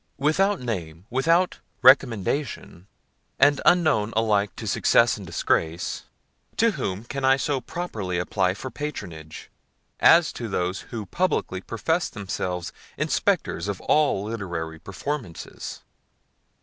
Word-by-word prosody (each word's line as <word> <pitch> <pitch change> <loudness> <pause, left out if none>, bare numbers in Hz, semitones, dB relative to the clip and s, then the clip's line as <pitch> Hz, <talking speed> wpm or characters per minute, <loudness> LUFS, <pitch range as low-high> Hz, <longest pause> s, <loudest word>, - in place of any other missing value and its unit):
Without 185 +8 +2
name, 90 -8 -5
without 165 +8 +2 0.2
recommendation, 130 - +2 0.5
and 145 +1 +4
unknown 155 -12 +4
alike 105 -2 +1
to - - -7
success 115 0 +3
and 100 -3 -9
disgrace, 80 0 -1 0.5
to 230 0 +4
whom 95 - -3
can 135 +3 -5
I 135 0 +5
so 135 -1 -1
properly 110 - -4
apply 90 +1 0
for 130 +5 -7
patronage, 85 - -7 0.5
as 170 -1 +6
to 120 - -5
those 90 0 -1
who 110 -3 -5
publicly 125 - -1
profess 160 - -1
themselves 90 -4 -4 0.2
Inspectors 85 - 0
of 100 -2 -3
all 150 -10 +2
literary 85 -7 -4
performances? 105 - -6
110 Hz, 115 wpm, -25 LUFS, 95-145 Hz, 0.5 s, as